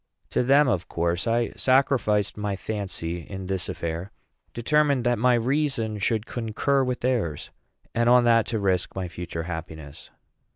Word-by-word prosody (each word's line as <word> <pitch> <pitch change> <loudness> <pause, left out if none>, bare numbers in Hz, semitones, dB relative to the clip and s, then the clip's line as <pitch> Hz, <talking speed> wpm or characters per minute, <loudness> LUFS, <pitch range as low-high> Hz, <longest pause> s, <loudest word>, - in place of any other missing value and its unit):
To - - +2
them, 140 +3 +5
of 95 -8 0
course, 85 +4 -1
I 115 +1 +1
sacrificed 130 -6 +2
my 105 -1 -2
fancy 95 -5 -4
in 95 +3 -7
this 95 -1 -2
affair, 85 +3 -4 0.4
determined 140 +2 +2
that 120 -1 +1
my 125 +1 +4
reason 120 -3 0
should 110 +2 0
concur 125 +4 0
with 125 -1 -2
theirs, 115 - -1 0.4
and 120 0 +2
on 125 0 +6
that 115 -2 +4
to 115 - -1
risk 95 -3 0
my 95 -1 -3
future 85 -1 -5
happiness. 80 -4 -8
110 Hz, 155 wpm, -25 LUFS, 90-125 Hz, 0.4 s, on